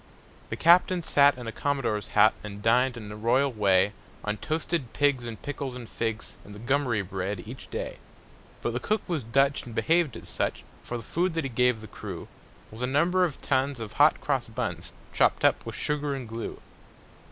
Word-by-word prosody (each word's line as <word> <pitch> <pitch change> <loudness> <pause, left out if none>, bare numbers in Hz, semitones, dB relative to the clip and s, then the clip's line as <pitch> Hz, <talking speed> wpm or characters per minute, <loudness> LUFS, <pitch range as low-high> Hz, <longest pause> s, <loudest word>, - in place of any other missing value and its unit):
The - - -2
captain 175 +1 +5
sat 145 -3 +5
in 125 - -7
a 115 - -3
commodore's 135 -6 -1
hat 110 - +7
And 105 -1 -8
dined, 125 +2 +3
in 105 -2 -8
a - - -6
royal 125 +6 +2
way, 100 -1 +3 0.3
On 105 0 -1
toasted 155 -1 -2
pigs 140 -4 +2
and 115 -2 -6
pickles 140 -3 -5
and 120 -2 -8
figs 115 -1 -4
And 100 - -11
gummery 130 -6 +1
bread, 95 0 -3
each 120 +4 -9
day. - - -4 0.7
But 120 - -1
the 120 - -1
cook 215 +9 0
was 170 -5 -1
Dutch, 135 +5 +2
and 120 -2 -9
behaved 160 +4 +2
as - - -11
such; - - -2 0.2
For 120 - -5
the 115 - -8
food 175 - -1
that 165 - 0
he 135 - -4
gave 125 -1 +2
the 110 - -9
crew - - -7 0.4
Was 110 +2 -9
a 125 - +1
number 170 +7 +3
of 165 -6 -2
tons 135 -1 +1
of 110 -3 -6
hot - - +5
cross - - 0
buns, - - -4 0.2
Chopped - - +3
up - - +2
with - - -5
sugar 150 -1 -1
and 130 -3 -6
glue. 115 +1 -5
125 Hz, 195 wpm, -27 LUFS, 110-145 Hz, 0.7 s, hat